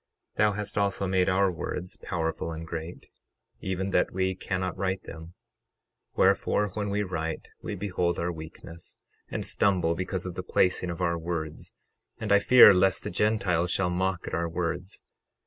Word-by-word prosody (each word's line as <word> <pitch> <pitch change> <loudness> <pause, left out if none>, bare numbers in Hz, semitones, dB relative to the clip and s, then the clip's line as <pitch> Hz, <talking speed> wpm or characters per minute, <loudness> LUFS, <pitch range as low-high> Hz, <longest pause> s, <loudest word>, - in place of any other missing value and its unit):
12:25 - - -32
Thou 105 0 +4
hast 105 0 -5
also 100 -1 0
made 95 0 +2
our 95 0 +3
words 90 +1 -5
powerful 85 -2 -3
and 80 0 -6
great, 80 +1 -7 0.5
even 95 +1 -2
that - - +2
we 95 0 0
cannot 95 0 -3
write 95 0 -2
them; 85 +1 -10 0.8
wherefore, 105 0 +3
when 105 +1 -3
we 105 +1 0
write 80 -4 -4
we - - -4
behold 90 -3 -1
our 85 +1 -1
weakness, 80 +1 -10 0.3
and - - -4
stumble 90 -5 +2
because 95 +1 -3
of 90 - -4
the 90 - -4
placing 90 0 +1
of 85 +1 -5
our 85 -1 +1
words; 80 -2 -5 0.4
and 110 -2 -3
I 100 - +7
fear 125 +1 +9
lest 95 0 +2
the - - -4
Gentiles 95 -5 +1
shall 90 0 +1
mock 90 0 -1
at - - -6
our 85 0 0
words. 90 +2 -3
90 Hz, 170 wpm, -27 LUFS, 85-95 Hz, 0.8 s, fear